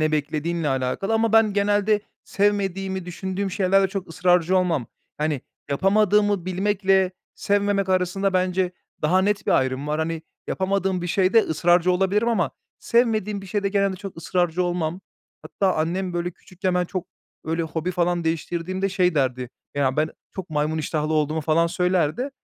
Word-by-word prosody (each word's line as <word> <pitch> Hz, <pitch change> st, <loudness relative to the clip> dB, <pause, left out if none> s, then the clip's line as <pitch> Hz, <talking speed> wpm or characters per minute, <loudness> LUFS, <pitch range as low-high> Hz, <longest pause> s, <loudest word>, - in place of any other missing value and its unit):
ne 155 Hz, 0 st, +1 dB
beklediğinle 155 Hz, +2 st, -1 dB
alakalı 135 Hz, +11 st, -1 dB
ama 225 Hz, 0 st, +2 dB
ben 225 Hz, -2 st, +5 dB
genelde 205 Hz, +1 st, +2 dB, 0.2 s
sevmediğimi 195 Hz, -2 st, -1 dB
düşündüğüm 190 Hz, +2 st, -3 dB
şeylerde 195 Hz, 0 st, +3 dB
çok 190 Hz, -1 st, -5 dB
ısrarcı 180 Hz, +1 st, +2 dB
olmam. 170 Hz, -9 st, +1 dB, 0.3 s
Hani, 150 Hz, -3 st, -1 dB, 0.3 s
yapamadığımı 205 Hz, +2 st, +2 dB
bilmekle 190 Hz, 0 st, +2 dB, 0.2 s
sevmemek 200 Hz, -1 st, 0 dB
arasında 190 Hz, +1 st, +1 dB
bence 185 Hz, 0 st, +1 dB, 0.3 s
daha 180 Hz, +5 st, +3 dB
net 200 Hz, 0 st, 0 dB
bir -, -, +3 dB
ayrım 130 Hz, +2 st, +1 dB
var. 150 Hz, +1 st, -1 dB
Hani, 160 Hz, 0 st, -2 dB, 0.2 s
yapamadığım 190 Hz, -1 st, -1 dB
bir 175 Hz, -, -2 dB
şeyde 190 Hz, +4 st, +3 dB
ısrarcı 175 Hz, +3 st, +2 dB
olabilirim 195 Hz, +5 st, +1 dB
ama 180 Hz, -, +1 dB, 0.3 s
sevmediğim 215 Hz, -4 st, +1 dB
bir -, -, -9 dB
şeyde 200 Hz, +1 st, -1 dB
genelde 195 Hz, -1 st, +1 dB
çok 195 Hz, 0 st, -8 dB
ısrarcı 175 Hz, +1 st, 0 dB
olmam. 175 Hz, 0 st, -2 dB, 0.4 s
Hatta 190 Hz, -2 st, 0 dB
annem, 175 Hz, +4 st, -1 dB
böyle, 175 Hz, 0 st, -2 dB
küçükken 185 Hz, +1 st, -4 dB
ben 180 Hz, 0 st, +2 dB
çok, 185 Hz, 0 st, -5 dB, 0.4 s
böyle, 165 Hz, +1 st, -1 dB
hobi 160 Hz, +2 st, -3 dB
falan 175 Hz, -1 st, 0 dB
değiştirdiğimde 170 Hz, +4 st, -2 dB
şey 180 Hz, -2 st, +1 dB
derdi, 130 Hz, -3 st, 0 dB, 0.2 s
ya, 135 Hz, -1 st, +1 dB
ben 155 Hz, +1 st, +2 dB, 0.2 s
çok 190 Hz, -3 st, -7 dB
maymun 155 Hz, +1 st, 0 dB
iştahlı 155 Hz, 0 st, -1 dB
olduğumu 155 Hz, +1 st, +1 dB
falan 160 Hz, +2 st, +2 dB
söylerdi. 180 Hz, -, 0 dB
180 Hz, 150 wpm, -23 LUFS, 160-195 Hz, 0.4 s, ben